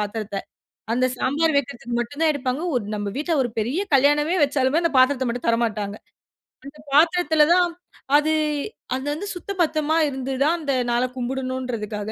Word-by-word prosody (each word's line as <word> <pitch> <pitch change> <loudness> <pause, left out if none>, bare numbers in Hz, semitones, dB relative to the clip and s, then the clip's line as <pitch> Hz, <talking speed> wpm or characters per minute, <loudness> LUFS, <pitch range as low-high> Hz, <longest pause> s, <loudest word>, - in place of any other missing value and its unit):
பாத்தீரத்த 210 -1 -3 0.6
அந்த 255 +1 +2
சாம்பார் 305 +5 +1
வைக்கிறதுக்கு 240 -3 -2
மட்டும் 285 +7 -4
தான் 315 -1 +4
எடுப்பாங்க. 260 +1 -2
ஒரு 235 - -1
நம்ம 205 0 -3
வீட்ல 310 +4 -1
ஒரு 245 - -2
பெரிய 250 - -1 0.2
கல்யாணமே 295 +5 +3
வச்சாலுமே 280 +2 +1
அந்த 335 - +1
பாத்திரத்தை 260 0 +3
மட்டும் 240 +1 -3
தரமாட்டாங்க. 215 -3 -1 0.7
அந்த 285 +2 -11
பாத்திரத்தில 320 0 +4
தான் 355 0 +4 0.5
அது, 305 +1 +1 0.6
அது 265 +2 -5
அந்து 335 +7 -5
சுத்த 355 +3 -6
பத்தமா 310 -1 +1
இருந்து 265 -1 -4
தான் 315 +4 +3
அந்த 290 -4 -1 0.2
நாளை 240 +1 +2
கும்பிடணுன்றதுக்காக 250 -5 -4
265 Hz, 155 wpm, -23 LUFS, 240-305 Hz, 0.7 s, தான்